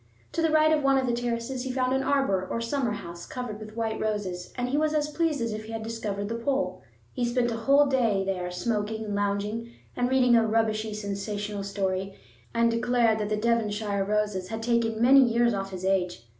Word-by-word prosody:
To 335 - -1
the 325 - +3
right 310 0 +4
of 305 - +2
one 275 0 +4
of 265 - +1
the 240 - 0
terraces 240 +1 -2
he 260 0 -3
found 255 0 0
an 265 - +2
arbor 270 -9 +1
or - - -2
summer 230 0 -1
house 170 -4 -8
covered 245 -4 -5
with 215 0 -10
white 225 -1 -2
roses, 195 -5 -3
and 245 0 -1
he 270 - 0
was 310 +1 +1
as 300 0 +1
pleased 310 -3 0
as 230 -2 -1
if 215 0 -6
he 225 - -8
had 225 0 -4
discovered 210 -3 -3
the 225 - -3
Pole. 275 +4 -1 0.3
He 250 - -2
spent 240 0 +1
a - - -2
whole 275 +6 +4
day 235 -8 +2
there, 180 -2 -2
smoking 215 +3 -2
and 205 - -4
lounging 205 +3 -2 0.2
and 245 0 0
reading 255 -2 +4
a 230 - +5
rubbishy 220 -1 0
sensational 205 0 -4
story, 195 -1 -2 0.4
and 230 0 +2
declared 230 -1 +2
that 210 -1 -2
the 215 - 0
Devonshire 210 -3 0
roses 205 -2 -1
had 225 +2 -5
taken 230 -1 +1
many 260 +4 +7
years 235 -2 +4
off 195 -1 -3
his 185 -1 -6
age. 180 -8 0
225 Hz, 215 wpm, -27 LUFS, 205-245 Hz, 0.4 s, many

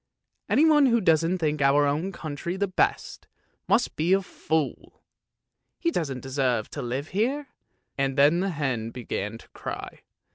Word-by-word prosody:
Anyone 300 -2 +5
who 235 -1 +3
doesn't 165 -1 +2
think 155 -3 -1
our 140 +1 +4
own 155 +7 0
country 170 +1 -5
the 200 +1 0
best, 185 - -1 0.4
must - - +2
be 165 +5 +2
a 195 0 +3
fool! 160 -4 -3 0.7
He 335 - 0
doesn't 140 - -2
deserve 130 -4 -1
to - - -5
live 130 +5 -3
here." 260 +8 -1 0.5
And 135 0 0
the 170 +7 +4
hen 130 -9 -2
began 115 -3 -4
to - - -17
cry. - - -7
155 Hz, 145 wpm, -26 LUFS, 135-190 Hz, 0.7 s, Anyone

